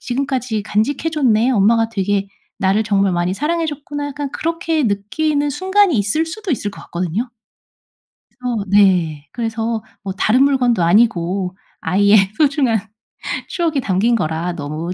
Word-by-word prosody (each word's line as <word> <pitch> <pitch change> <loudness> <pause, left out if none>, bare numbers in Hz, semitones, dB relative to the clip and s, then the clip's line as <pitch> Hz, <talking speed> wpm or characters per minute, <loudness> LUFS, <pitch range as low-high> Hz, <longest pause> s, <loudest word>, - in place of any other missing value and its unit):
지금까지 255 -4 -2
간직해 220 +9 0
줬네. 250 -6 +2
엄마가 225 0 +3
되게 200 -2 -1 0.3
나를 195 +3 +2
정말 200 -3 +1
많이 175 +1 0
사랑해 325 - -1
줬구나.' 290 -1 -4
약간 285 -1 -5
그렇게 330 -1 -1
느끼는 285 +8 0
순간이 380 +1 +2
있을 215 +11 +1
수도 385 +4 -6
있을 220 -7 -1
것 200 - -12
같거든요. 185 +8 -3 1.0
그래서 245 -4 -3
네 180 -7 +3
그래서 225 -1 -3 0.2
뭐 195 -1 -4
다른 225 +6 +3
물건도 250 -8 +2
아니고 185 -1 +2 0.3
아이의 200 +5 +4 0.2
소중한 280 -7 +2 0.7
추억이 330 -5 -1
담긴 215 +4 +1
거라 165 -2 -2
너무 155 +2 -5
225 Hz, 315 characters per minute, -18 LUFS, 195-285 Hz, 1.0 s, 아이의